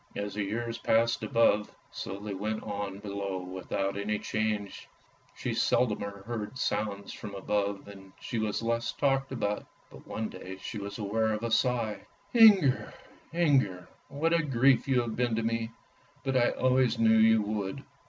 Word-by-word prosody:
As 100 -1 -3
the 105 0 -1
years 115 +3 -3
passed 115 +1 +2
above, 115 -4 +3 0.2
so 95 - -5
they 105 0 -5
went 105 +3 -3
on 100 -2 -4
below 100 -2 -4
without 95 +1 -3
any 105 +1 -1
change: 105 -2 -2 0.5
she - - -3
seldomer 100 -4 0
heard 115 +1 -5
sounds 100 -4 -2
from 100 -2 -8
above, 100 0 -1
and 95 -1 -12
she 115 - -3
was 110 +1 -1
less 115 0 0
talked 135 -1 +1
about. 105 -5 -1 0.3
But - - -14
one 110 0 -3
day 95 +1 -8
she 105 - -6
was 100 0 -6
aware 110 +1 0
of 105 +1 -3
a 115 - -2
sigh. 115 -2 0
" 205 - -33
Inger, 205 - +6 0.4
Inger, 135 - +2 0.2
what 150 +4 0
a 170 - +4
grief 135 -2 +3
you 130 -2 +3
have 115 -2 -4
been 120 -2 +1
to 115 - -1
me, 115 0 -1 0.5
but 135 -1 -1
I 120 -1 +4
always 130 -2 +2
knew 110 0 +5
you 110 0 +5
would." 105 -2 -3
110 Hz, 170 wpm, -29 LUFS, 100-120 Hz, 0.5 s, Inger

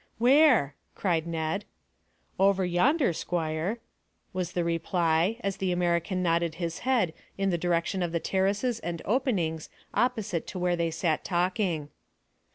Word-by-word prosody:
"Where?" 250 - +5 0.2
cried 170 -4 0
Ned. 165 +4 -2 0.8
"Over 195 -1 +4
yonder, 240 - +2
squire," 165 +5 -2 0.6
was 185 -1 -3
the 175 - 0
reply, 170 +3 +1
as 195 -3 -2
the 190 -1 -1
American 175 +1 0
nodded 170 -1 +1
his 170 -1 -4
head 235 -10 +1 0.2
in 195 -1 +1
the - - +1
direction 175 +2 0
of 175 -2 -1
the 170 - 0
terraces 200 +7 0
and 170 -5 -5
openings 190 - 0 0.2
opposite 220 -9 0
to - - -6
where 180 -1 +1
they 170 -1 0
sat 160 -1 -1
talking. 175 -4 0
180 Hz, 140 wpm, -28 LUFS, 165-200 Hz, 0.8 s, Where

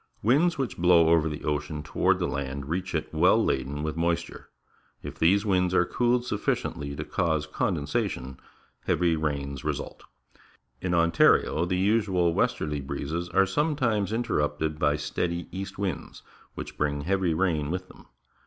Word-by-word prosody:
Winds 150 - +3
which 130 -10 -3
blow 85 -2 +5
over 80 -1 +3
the 75 - -6
ocean 75 0 -2
toward - - +1
land 70 -1 -3
reach 90 +3 -3
it 80 - -3
well 90 +6 +4
laden 70 +3 -1
with 80 0 -3
moisture. 85 0 -2 0.5
If - - -8
these 100 +6 +3
winds 90 -2 +2
are 90 - +4
cooled 120 +5 +1
sufficiently 70 - -2
to - - -4
cause 80 -3 0
condensation, 65 -4 -2 0.5
heavy 85 -2 +2
rains 70 -3 -3
result. - - -4 0.8
In 90 -1 0
Ontario 85 0 +3
the 90 +1 -1
usual 95 -4 +2
westerly 75 -3 0
breezes 80 +6 -4
are 95 - +4
sometimes 115 - 0
interrupted 75 -9 -1
by 75 -1 +2
steady 85 +3 -3
east 95 +2 -6
winds, 95 -6 -4 0.3
which - - -8
bring 75 -1 0
heavy 90 0 0
rain 80 -5 0
with 90 +2 -3
them. - - -17
85 Hz, 145 wpm, -27 LUFS, 75-95 Hz, 0.8 s, blow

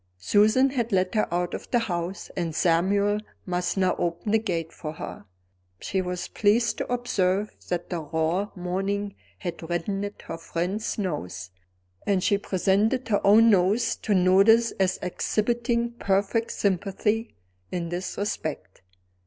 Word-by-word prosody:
Susan 215 - +4
had 240 -3 -1
let 185 -1 +1
her 215 -5 +1
out 175 0 -1
of - - -6
the 245 - +3
house; 180 -4 -3
and 170 -4 -2
Samuel 200 +5 +2 0.3
must 180 +1 -1
now 185 -1 +2
open 175 +4 -1
the 220 - +4
gate 170 -7 -3
for 155 -1 -6
her. 130 - -8 0.5
She 190 - -1
was 180 -1 -4
pleased 225 +3 +2
to - - -3
observe 210 -5 0
that 175 0 -3
the 175 - -1
raw 160 +6 -1
morning 195 +3 -2 0.2
had 175 -3 -5
reddened 195 +4 -2
her 165 - -6
friend's 180 +6 -2
nose; 95 - -4 0.6
and 195 -3 +2
she 200 - +2
presented 205 +7 +1
her 205 - +2
own 225 +3 +7
nose 200 +4 +3
to 210 - 0
notice 195 +6 +5
as 190 -1 +2
exhibiting 235 +5 0
perfect 205 0 0
sympathy 200 +3 -1 0.4
in 170 -2 -3
this 175 +2 -4
respect. 205 +1 -4
195 Hz, 145 wpm, -26 LUFS, 175-215 Hz, 0.6 s, own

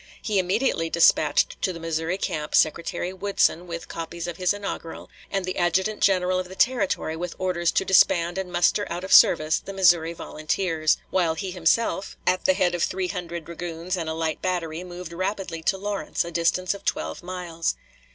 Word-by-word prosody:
He 210 -3 0
immediately 185 -2 0
dispatched 170 - +3
to 190 - +1
the 170 - -8
Missouri 165 +2 -2
camp 150 -5 -3
Secretary 170 +3 +1
Woodson 190 -2 +1
with 170 -1 -6
copies 165 +1 -6
of 175 -1 -5
his 180 -1 +2
inaugural, 200 -5 -6 0.2
and 195 -2 -1
the 185 - -4
adjutant 190 +5 +1
general 185 -1 +3
of 180 -1 -5
the 190 - -9
Territory 200 -9 +1
with 175 +1 -5
orders 175 -2 0
to 190 - +1
disband 175 -1 +4
and 185 -2 -5
muster 175 +4 +2
out 175 +2 -4
of 190 - -1
service 155 +1 +6
the 195 - -9
Missouri 175 -3 +4
volunteers, 160 0 -1
while 170 -4 +1
he 185 +3 -4
himself, 190 +3 0
at 185 0 +1
the 190 - +4
head 180 -2 +2
of 175 - -2
three 185 0 -1
hundred 170 -2 -5
dragoons 170 +1 -4
and 165 -3 -3
a 160 - -3
light 160 -1 -2
battery, 175 -2 -2
moved 175 -1 -8
rapidly 185 -2 -3
to 190 +4 +1
Lawrence, 200 -2 -2
a 170 - -6
distance 175 +3 +1
of 200 0 -10
twelve - - -2
miles. 175 -2 -3
175 Hz, 185 wpm, -25 LUFS, 165-190 Hz, 0.2 s, service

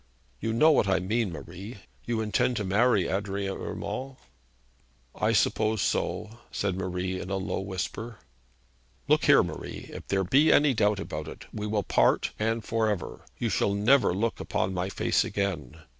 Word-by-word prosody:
'You 115 - -2
know 155 +8 +5
what 125 - +3
I 95 -1 +3
mean, 105 +2 0
Marie. 90 - -8 0.3
You 115 -2 -1
intend 110 +3 +1
to 105 - -1
marry 100 0 +3
Adrian 100 0 -2
Urmand?' 135 +1 -5 1.0
'I - - +1
suppose 110 0 +2
so,' 110 +2 -2
said 95 -3 -1
Marie 95 0 -3
in 90 - -7
a 95 - -1
low 95 - -2
whisper. 100 +4 -5 0.9
'Look - - +3
here, - - +7
Marie, - - -7
if - - -9
there 95 -1 +1
be 140 - +4
any 145 -2 +5
doubt 105 -3 +2
about - - -5
it, - - -9
we 105 0 -3
will 105 -1 0
part, - - +2
and 115 0 -1
for 115 -1 +1
ever. 100 -5 -4
You - - -1
shall 100 - +1
never 115 +5 +4
look 110 +6 -1
upon 95 - -1
my 90 +1 -2
face - - +1
again. 85 -9 -3
105 Hz, 170 wpm, -28 LUFS, 95-115 Hz, 1.0 s, here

